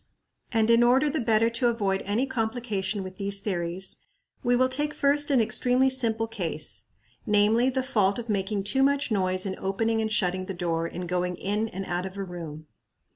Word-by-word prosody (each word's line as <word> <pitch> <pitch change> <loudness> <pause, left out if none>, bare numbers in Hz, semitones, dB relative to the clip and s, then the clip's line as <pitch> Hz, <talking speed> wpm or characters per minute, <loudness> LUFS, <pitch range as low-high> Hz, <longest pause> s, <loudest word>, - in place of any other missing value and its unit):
And 225 -1 +2
in 230 0 +5
order 260 +5 +4
the 315 - -1
better 225 -2 +3
to 230 +1 +1
avoid 200 -5 0
any 220 +6 +1
complication 220 -5 -2
with 185 0 -9
these 200 0 0
theories, 185 -2 -3 0.4
we 245 0 +2
will 255 +1 +3
take 295 +3 -1
first 290 +1 +3
an 275 -3 +4
extremely 250 +3 +2
simple 225 -3 +2
case, 165 - -4 0.4
namely, 210 +4 +3
the 260 0 -1
fault 205 -7 +1
of 235 -1 -5
making 200 -1 -1
too 265 +7 +1
much 280 -1 +2
noise 185 -2 +1
in 190 -1 -2
opening 225 +4 0
and 220 0 -2
shutting 185 -3 0
the 195 - -5
door 165 -2 -1
in 180 +1 -6
going 180 0 -1
in 205 +5 -1
and 195 -2 -6
out 175 +1 -2
of 190 +1 -11
a 195 - -3
room. 165 -4 -8
210 Hz, 190 wpm, -26 LUFS, 185-240 Hz, 0.4 s, in